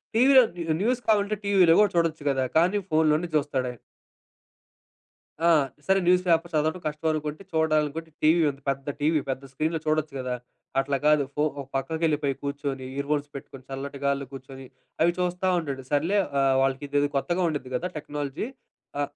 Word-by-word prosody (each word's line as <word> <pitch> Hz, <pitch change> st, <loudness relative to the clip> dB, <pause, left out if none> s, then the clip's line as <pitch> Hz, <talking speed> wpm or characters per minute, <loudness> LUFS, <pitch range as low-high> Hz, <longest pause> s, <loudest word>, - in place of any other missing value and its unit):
టీవీలో 260 Hz, +3 st, +7 dB, 0.2 s
new 165 Hz, -2 st, -1 dB
news 245 Hz, +3 st, +1 dB
కావాలంటే 210 Hz, -1 st, +2 dB
టీవీలో 190 Hz, -5 st, +5 dB
గూడా 210 Hz, -1 st, +4 dB
చూడొచ్చు 165 Hz, -3 st, +1 dB
గదా! 135 Hz, -1 st, +1 dB
కానీ 180 Hz, +5 st, +3 dB
ఫోన్‌లోనే 155 Hz, +1 st, +2 dB
జూస్తాడాయన. 130 Hz, -5 st, -1 dB, 1.7 s
ఆ! -, -, +6 dB, 0.4 s
సరే 190 Hz, 0 st, +4 dB
న్యూస్ 180 Hz, +1 st, +4 dB
పేపర్ 170 Hz, 0 st, +2 dB
చదవడం 155 Hz, +3 st, 0 dB
కష్టమనుకుంటే 155 Hz, +2 st, -2 dB
చూడాలనుకుంటే 160 Hz, 0 st, 0 dB
టీవీ 160 Hz, +3 st, +5 dB
ఉంది. 140 Hz, 0 st, -8 dB
పెద్ద 135 Hz, 0 st, -2 dB, 0.2 s
టీవీ 155 Hz, +1 st, +3 dB
పెద్ద 130 Hz, +1 st, -3 dB
స్క్రీన్‌లో 155 Hz, +4 st, -1 dB
చూడొచ్చు 155 Hz, -1 st, 0 dB
గదా! 125 Hz, -1 st, -3 dB, 0.5 s
అట్లా 140 Hz, 0 st, 0 dB
కాదు. 150 Hz, -1 st, +5 dB
ఫో 150 Hz, -, 0 dB, 0.2 s
ఒక 140 Hz, -, -5 dB
పక్కకెళ్ళిపోయి 150 Hz, 0 st, 0 dB
కూర్చొని, 140 Hz, -2 st, -3 dB
ఇయర్ 140 Hz, 0 st, -3 dB
ఫోన్స్ 145 Hz, -1 st, 0 dB
పెట్టుకొని 135 Hz, -1 st, -9 dB
చల్లటిగాళ్ళో 140 Hz, 0 st, -2 dB
కూర్చొని 135 Hz, 0 st, -10 dB, 0.4 s
అవి 170 Hz, +1 st, +3 dB
చూస్తా 180 Hz, +1 st, -1 dB
ఉంటాడు. 140 Hz, -5 st, -5 dB
సర్లే 165 Hz, +8 st, +2 dB, 0.2 s
ఆహ్, 135 Hz, -1 st, +3 dB
వాళ్ళకిదేదో 145 Hz, +2 st, 0 dB
కొత్తగా 175 Hz, +6 st, -1 dB
ఉండిద్ది 140 Hz, -4 st, -5 dB
గదా! 180 Hz, +8 st, -2 dB
టెక్నాలజీ. 145 Hz, -, -4 dB, 0.5 s
ఆ! -, -, 0 dB
150 Hz, 150 wpm, -26 LUFS, 140-170 Hz, 1.7 s, టీవీలో